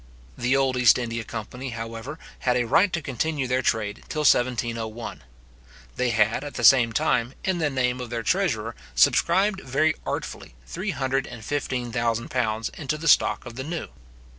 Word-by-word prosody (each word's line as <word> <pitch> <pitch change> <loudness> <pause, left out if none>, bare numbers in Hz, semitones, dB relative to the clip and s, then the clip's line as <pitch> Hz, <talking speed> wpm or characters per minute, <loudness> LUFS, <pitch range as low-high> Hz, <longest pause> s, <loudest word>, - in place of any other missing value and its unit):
The 125 +3 +1
old 135 -2 +1
East 125 -2 +6
India 115 -2 -3
company, 120 +4 -6
however, 115 +5 -6 0.2
had 125 -1 +1
a 120 - +2
right 180 - +4
to 170 -3 -2
continue 145 +2 -1
their 125 +1 +1
trade 105 -4 -1
till 155 - -2
1701. 115 -3 0 0.7
They 125 -1 0
had, 115 +2 +2
at 145 - -7
the 120 - -4
same 120 -1 +7
time, 120 +3 0
in 185 -2 0
the 155 -2 +1
name 125 -2 0
of 125 - -6
their 115 -1 -3
treasurer, - - 0 0.2
subscribed 190 - +3
very 155 +5 +1
artfully - - -5
three 190 +5 -4
hundred 135 -4 -1
and 110 -2 -9
fifteen 130 -4 -2
thousand 115 -1 -1
pounds 110 -3 -1
into 150 0 -4
the 165 +2 -5
stock - - +4
of 120 -1 -9
the 130 - -3
new. 165 +3 -5
125 Hz, 175 wpm, -25 LUFS, 115-145 Hz, 0.7 s, same